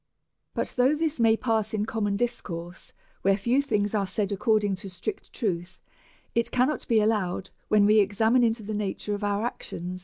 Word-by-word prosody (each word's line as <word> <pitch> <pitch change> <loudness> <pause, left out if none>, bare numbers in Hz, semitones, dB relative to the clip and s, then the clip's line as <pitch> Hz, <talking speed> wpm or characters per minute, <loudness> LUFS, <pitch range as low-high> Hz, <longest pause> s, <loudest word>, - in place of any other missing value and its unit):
But - - -2
though 255 +4 +4
this 315 -2 -1
may 225 -1 +4
pass 220 -3 0
in 210 0 0
common 205 -2 -1
discourse, 180 -7 -4 0.3
where 195 0 +3
few 240 +7 +2
things 210 -7 0
are 200 -3 +1
said 205 +1 -2
according 210 0 +2
to 195 - -7
strict 185 - -6
truth, 180 -6 -3 0.5
it 235 0 +1
cannot 255 +4 0
be 230 -3 +4
allowed 210 -4 0 0.2
when 210 -1 +4
we 215 +1 +6
examine 220 +5 +3
into 225 -1 +1
the 215 +1 -4
nature 210 0 -2
of 205 0 -4
our 205 +2 0
ac 240 - -4
tions. 180 +2 -5
210 Hz, 185 wpm, -27 LUFS, 200-230 Hz, 0.5 s, we